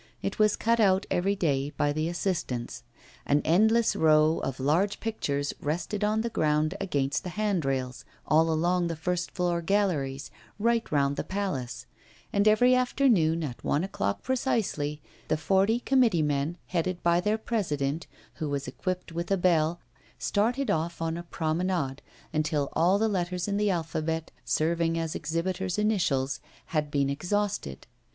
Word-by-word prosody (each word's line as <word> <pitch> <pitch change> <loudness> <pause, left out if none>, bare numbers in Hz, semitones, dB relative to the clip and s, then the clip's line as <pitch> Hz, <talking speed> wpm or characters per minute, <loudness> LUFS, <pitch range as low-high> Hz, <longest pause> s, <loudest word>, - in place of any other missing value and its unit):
It 195 - -3
was 215 -1 +4
cut 230 +1 +1
out 195 -2 +4
every 195 +3 +1
day 145 -7 0
by 145 0 0
the 155 +2 -1
assistants. 155 -10 -3 0.4
An 145 +1 +2
endless 220 +7 +4
row 155 0 +4
of 135 -1 -4
large 165 +10 +1
pictures 145 -11 -2
rested 175 +7 -2
on 215 +1 +2
the 235 +1 -3
ground 155 -2 +1
against 145 -7 -1
the 180 - -4
handrails, 140 -11 -1 0.2
all 160 +1 +4
along 175 +2 +1
the 165 - -3
first 180 +2 -2
floor 175 -2 -1
galleries, 165 -8 0 0.3
right 230 +2 +1
round 140 -1 +1
the - - -1
Palace; 185 -11 -3 0.5
and 200 +1 +3
every 245 +4 +5
afternoon, 235 - +3
at 125 -6 -6
one 150 - +1
o'clock 100 - -2
precisely, 190 - -1 0.2
the 155 - +1
forty 195 +8 +2
committee 245 - +3
men, 150 +3 -1
headed 180 0 -2
by 170 0 +3
their 210 +4 +1
president, 165 -9 -2 0.3
who 155 - -3
was 140 0 -2
equipped 185 -2 -4
with 170 +1 -4
a 195 - +2
bell, 170 -2 +2 0.4
started 240 +7 0
off 165 +2 -1
on 165 0 -1
a 170 - -4
promenade, 160 -4 -2 0.3
until 150 -2 0
all 175 +5 +3
the 220 +2 +2
letters 180 -2 -1
in 200 0 0
the 210 0 +2
alphabet, 160 -2 -2
serving 165 +5 +1
as 165 -1 -2
exhibitors' 175 +4 -2
initials, 170 -11 +1 0.3
had 150 -2 0
been 140 -1 +1
exhausted. 175 - -2
170 Hz, 155 wpm, -28 LUFS, 150-200 Hz, 0.5 s, every